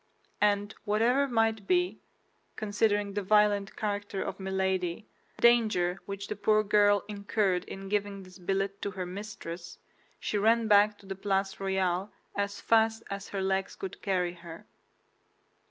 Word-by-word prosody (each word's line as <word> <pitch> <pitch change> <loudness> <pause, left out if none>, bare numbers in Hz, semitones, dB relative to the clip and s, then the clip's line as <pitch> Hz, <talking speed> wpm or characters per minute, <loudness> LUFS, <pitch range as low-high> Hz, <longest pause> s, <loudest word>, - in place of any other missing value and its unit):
And 205 0 +2
whatever 235 +6 +2
might 225 -4 +1
be—considering 210 - -1
the 205 - -1
violent 205 0 +3
character 205 -2 -3
of - - -5
Milady—the 190 0 -3
danger 215 -7 +4
which 200 0 -5
the - - -3
poor 215 +1 +3
girl 205 -1 +4
incurred 200 -3 0
in 195 0 -8
giving 200 -1 -2
this 185 +1 -14
billet 195 +2 -2
to 200 - -2
her 190 -2 -5
mistress, 180 -3 -7 0.4
she 210 - -1
ran 225 +2 +3
back 205 0 +5
to 200 - -18
the 195 - -4
Place 195 0 -1
Royale 190 0 0 0.2
as 200 0 -2
fast 225 0 +2
as 200 0 -5
her 195 -1 -3
legs 190 0 -1
could 190 - -7
carry 180 -3 0
her. 170 -1 -11
200 Hz, 140 wpm, -29 LUFS, 190-210 Hz, 0.4 s, back